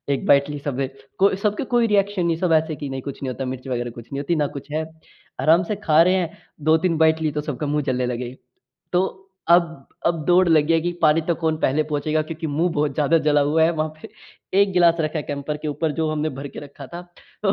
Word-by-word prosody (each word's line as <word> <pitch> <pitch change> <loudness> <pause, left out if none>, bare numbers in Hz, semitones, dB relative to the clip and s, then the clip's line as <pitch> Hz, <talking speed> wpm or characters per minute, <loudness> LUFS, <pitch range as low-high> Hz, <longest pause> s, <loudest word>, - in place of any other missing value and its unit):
1 - - -6
bite 140 +1 +5
ली 145 - -5
सबने 135 -1 -2 0.3
को 195 +1 +4
सब 205 +1 0
के - - -1
कोई 235 -1 +4
रिएक्शन 200 -3 +1
नहीं 165 -1 +1
है - - -14
सब 180 -3 +2
ऐसे 160 0 +2
कि 145 -1 -6
नहीं 135 0 -4
कुछ 140 +1 -7
नहीं 130 - -2
होता 135 +1 -5
मिर्च 130 0 -6
वग़ैरह 120 -2 -2
कुछ 120 -1 -11
नहीं 140 - -2
होती 165 +4 0
ना 150 -2 +1
कुछ 140 - -10
है। 155 +1 -1 0.6
आराम 165 +3 +4
से 210 +4 -3
खा 155 +1 +6
रहे 180 +2 +3
हैं 175 -3 -2 0.3
2-3 160 +1 +3
बाइट 160 0 +3
ली 155 - +1
तो 150 +1 -2
सबका 150 -1 -4
मुँह 150 +1 0
जलने 125 0 0
लगे 125 0 -3
हैं। 130 - -13 0.6
तो 190 +1 -1 0.2
अब 165 -5 +3 0.2
अब 170 -2 +1
दौड़ 180 0 +5
लगी 160 0 +4
है 165 - +3
कि 175 +2 -1
पानी 155 0 +5
तक 170 - +2
कौन 160 -1 +1
पहले 145 +4 +2
पहुँचेगा 150 +1 -1
क्योंकि 160 +1 -6
मुँह 160 +4 0
बहुत 150 0 0
ज़्यादा 155 +2 +3
जला 145 0 +4
हुआ 150 +3 +2
है। 165 - +3
वहाँ 155 -1 -1
पे - - -8 0.5
1 200 -1 +3
गिलास 170 -2 +4
रखा 155 0 -1
है 150 - -2
कैंपर 145 +1 -3
के 155 - -2
ऊपर 150 +2 -1
जो 160 +1 -1
हमने 155 0 -1
भर 140 +1 -5
के - - -11
रखा 140 -1 -11
था 175 - -5 0.4
तो 195 - +4
155 Hz, 255 wpm, -22 LUFS, 145-170 Hz, 0.6 s, खा